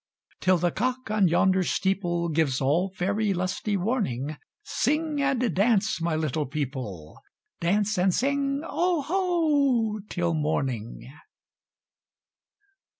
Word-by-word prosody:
Till 185 0 +3
the 175 +1 +1
cock 250 +3 -2
on 210 -3 +3
yonder 185 +3 +3
steepleGives 170 -6 0
all 160 +8 +1
faery 195 +2 -1
lusty 185 +3 -1
warning, 175 - -1 0.3
Sing 300 +2 0
and 255 -7 +1
dance, 210 0 +2
my 165 -1 0
little 155 -1 -1
people,—Dance 145 - -3
and 185 +1 +3
sing 275 - 0
"Oho" 310 - +1
till 175 -2 -1
morning! 135 -6 -2
190 Hz, 95 wpm, -26 LUFS, 160-250 Hz, 0.3 s, Till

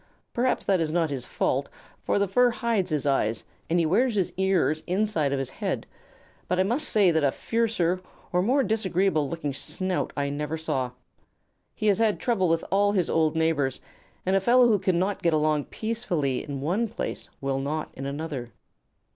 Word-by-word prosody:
Perhaps 250 +1 0
that 190 -2 +3
is 160 -2 0
not 165 -2 +1
his 130 -3 -2
fault, - - -1 0.3
for - - +1
the 200 0 +2
fur 245 +6 +4
hides 230 -5 0
his 150 -3 -1
eyes 115 -6 +1 0.3
and 170 - +2
he 170 - +3
wears 225 +8 +2
his 190 -4 0
ears 185 -5 +1
inside 180 -6 +1
of 140 - 0
his 135 -1 -3
head; - - -3 0.6
but 180 +1 0
I - - +5
must 245 +10 0
say 200 -5 +4
that 160 -2 +1
a 140 - +3
fiercer 210 -6 0 0.3
or 180 - +3
more 260 +8 +3
disagreeable 190 - +1
looking 155 -4 -3
snout 180 +7 -2
I 140 0 0
never 150 +2 -3
saw. 145 -6 -1 0.9
He 215 - -4
has 205 0 +3
had 220 -2 +2
trouble 205 -8 +1
with 165 0 +1
all 205 +1 +3
his 185 -4 +1
old 160 -1 +2
neighbors, 155 -5 +1 0.5
and 190 +1 +2
a 195 - +3
fellow 245 +4 +5
who 215 -3 +3
cannot 185 +2 0
get 170 -2 +2
along 150 -1 +1
peaceably 180 - -2
in 140 -2 -5
one 190 +11 0
place 225 - -5
will 135 -1 -1
not 150 +3 -3
in 135 +1 -6
another. 140 -5 -5
175 Hz, 190 wpm, -26 LUFS, 150-205 Hz, 0.9 s, I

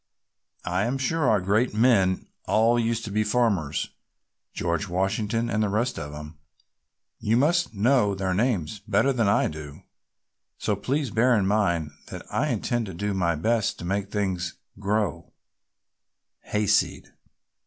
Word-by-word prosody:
I 90 +3 0
am 125 +3 -1
sure 135 +2 +1
our 105 - +4
great 105 +5 +1
men 105 -6 +3 0.2
all 115 +2 +3
used 115 0 -1
to 105 - -6
be 105 +1 +1
farmers, 105 - 0 0.6
George 85 +4 -2
Washington 100 +5 -1
and 110 -1 0
the 105 - +1
rest 115 +3 -1
of 75 -2 -6
'em. 75 +1 -9 0.8
You 110 +2 +1
must 165 0 +2
know 105 -1 +3
their 95 -1 -1
names 105 -3 0
better 110 +7 +1
than 115 -4 +1
I - - +3
do. 75 -2 -8 0.7
So 105 - 0
please 135 +5 -2
bear 120 +3 +3
in 100 - +1
mind 85 -7 +1 0.2
that - - -8
I - - +1
intend 120 -2 -1
to 95 - -7
do 100 +3 -2
my 85 -3 +1
best 110 +7 0
to - - -7
make 100 +2 -2
things 95 -4 -2 0.2
grow 100 -5 -1 1.1
hayseed!" 105 -1 0
105 Hz, 150 wpm, -25 LUFS, 95-115 Hz, 1.1 s, our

